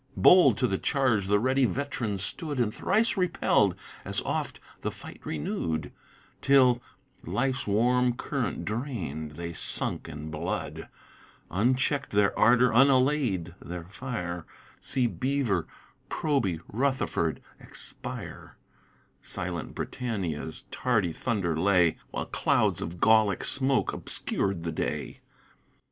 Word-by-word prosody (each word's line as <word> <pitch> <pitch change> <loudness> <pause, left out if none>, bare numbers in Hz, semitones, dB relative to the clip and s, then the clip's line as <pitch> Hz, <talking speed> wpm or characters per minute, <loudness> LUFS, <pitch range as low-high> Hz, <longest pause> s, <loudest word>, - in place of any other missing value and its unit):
Bold 140 - +7
to - - +2
the 95 - 0
charge 120 -9 +1
the 105 +1 +4
ready 130 +4 +2
vet'ran 125 -6 -2
stood 145 - -4
And 110 -3 +1
thrice 225 +1 +1
repell'd, 170 - +2 0.3
as - - -1
oft - - -3 0.2
the - - -1
fight - - -11
renewed, 80 +1 -3 0.5
Till 130 -3 +5 0.4
(life's 130 +10 -1
warm 125 +4 +3
current 130 0 -3
drain'd) 95 - -4
they 85 +2 -5
sunk - - +1
in 75 +1 -7
blood, 75 - -4 0.6
Uncheck'd 130 - +1
their 100 -1 +3
ardor, 125 +2 +5
unallay'd 130 - +3
their 85 0 -6
fire, 90 -4 -5 0.3
See 130 -2 0
Beaver, 120 - 0 0.4
Proby, 125 - 0
Rutherford, 125 - 0 0.2
expire; - - -7 0.6
Silent - - -4
Britannia's 90 -11 -4
tardy 110 -9 +1
thunder 95 -9 -1
lay 90 -1 +3
While - - -3
clouds - - +1
of 85 +2 -5
Gallick 110 -3 +4
smoke 135 -1 +2
obscur'd 95 -4 -2
the 85 - -2
day. 60 - -3
110 Hz, 115 wpm, -28 LUFS, 90-130 Hz, 0.6 s, Bold